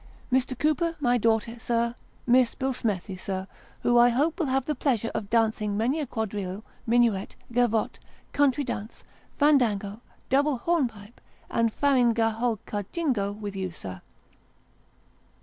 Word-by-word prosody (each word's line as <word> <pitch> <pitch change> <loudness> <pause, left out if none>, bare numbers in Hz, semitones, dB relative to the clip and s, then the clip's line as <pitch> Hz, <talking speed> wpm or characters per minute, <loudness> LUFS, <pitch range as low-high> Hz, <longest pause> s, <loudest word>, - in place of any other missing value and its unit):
Mr. 255 0 +1
Cooper, 330 +3 +1
my 245 -3 +2
daughter, 230 +1 +1
sir 235 0 0 0.3
Miss 250 0 +4
Billsmethi, 225 -8 -2
sir, 190 0 -4 0.4
who 240 0 +4
I 240 0 +7
hope 295 +8 +1
will 325 - +1
have 265 0 +1
the 305 - 0
pleasure 245 -5 0
of 200 - -4
dancing 220 -3 +1
many 250 +8 +1
a 295 - -2
quadrille, 205 -3 -4 0.2
minuet, 230 -4 +2 0.2
gavotte, 230 -3 +1 0.3
country 285 0 +3
dance, 230 -4 -6 0.3
fandango, 230 -8 +2 0.3
double 280 +1 +2
hornpipe, 240 -8 -2 0.3
and 230 -1 +2
farinagholkajingo 230 - 0
with 205 -2 -5
you, 190 -1 -2
sir. 95 - -8
235 Hz, 125 wpm, -27 LUFS, 210-265 Hz, 0.4 s, I